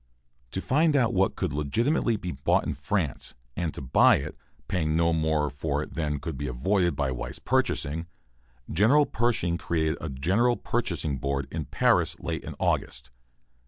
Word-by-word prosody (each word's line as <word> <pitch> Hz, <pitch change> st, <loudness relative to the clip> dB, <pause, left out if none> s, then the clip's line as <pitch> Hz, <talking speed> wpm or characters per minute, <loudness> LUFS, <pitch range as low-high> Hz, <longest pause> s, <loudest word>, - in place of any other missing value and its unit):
To 95 Hz, -, -3 dB
find 150 Hz, +6 st, +2 dB
out 125 Hz, -5 st, +3 dB
what 95 Hz, 0 st, +2 dB
could -, -, -2 dB
legitimately 115 Hz, -, +1 dB
be 90 Hz, -3 st, -5 dB
bought 65 Hz, -1 st, +1 dB
in 75 Hz, -, -1 dB
France, 70 Hz, +2 st, -2 dB, 0.2 s
and 85 Hz, -3 st, -1 dB
to -, -, -4 dB
buy 65 Hz, -, +5 dB
it, -, -, -4 dB, 0.3 s
paying 80 Hz, -4 st, 0 dB
no 85 Hz, 0 st, +3 dB
more 80 Hz, -2 st, +1 dB
for 70 Hz, +1 st, -2 dB
it -, -, -10 dB
than 75 Hz, -3 st, -2 dB
could 70 Hz, -, -5 dB
be 70 Hz, -, -3 dB
avoided 85 Hz, +9 st, +1 dB
by 70 Hz, -2 st, 0 dB
wise 60 Hz, -2 st, -4 dB
purchasing, 80 Hz, +4 st, 0 dB, 0.6 s
General 115 Hz, -, +4 dB
Pershing 105 Hz, -10 st, 0 dB
created 80 Hz, -1 st, -1 dB
a 80 Hz, -, -4 dB
General 95 Hz, -, +2 dB
Purchasing 80 Hz, -, -2 dB
Board 70 Hz, 0 st, -2 dB
in 80 Hz, -2 st, -3 dB
Paris -, -, +2 dB
late -, -, -4 dB
in -, -, -7 dB
August. -, -, -1 dB
80 Hz, 165 wpm, -27 LUFS, 70-95 Hz, 0.6 s, buy